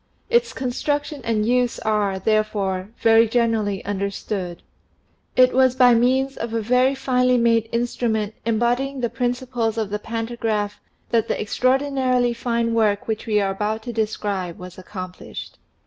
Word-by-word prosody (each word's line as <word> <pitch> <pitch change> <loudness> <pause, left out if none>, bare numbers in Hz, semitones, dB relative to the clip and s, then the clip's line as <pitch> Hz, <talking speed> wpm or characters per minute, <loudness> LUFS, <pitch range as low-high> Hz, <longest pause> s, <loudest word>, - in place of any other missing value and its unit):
Its 475 0 +3
construction 290 +3 -2
and 215 -2 0
use 245 +1 +1
are, 210 -3 0
therefore, 200 -2 0
very 225 0 +5
generally 225 -4 0
understood. 195 -2 -4 0.7
It 255 0 +5
was 260 -1 +4
by 250 -2 +6
means 260 +3 +2
o{ 230 0 -2
a - - +1
very 250 +4 +2
finely 250 -1 +2
made 230 -1 +2
instrument 230 -3 -1
embodying 245 +4 0
the 235 - -1
principles 245 -2 -1
of 215 -3 -2
the 210 - -2
pantagraph 225 -2 -3 0.3
that 230 -1 +2
the - - -1
extraordinarily 255 +1 +1
fine 235 -1 -1
work 210 -3 +1
which 220 0 -3
we 210 -1 +2
are 195 -1 0
about 215 +3 -2
to 240 - -5
describe 205 -5 -2
was 180 0 -10
accomplished. 185 -1 -8
230 Hz, 145 wpm, -22 LUFS, 210-250 Hz, 0.7 s, by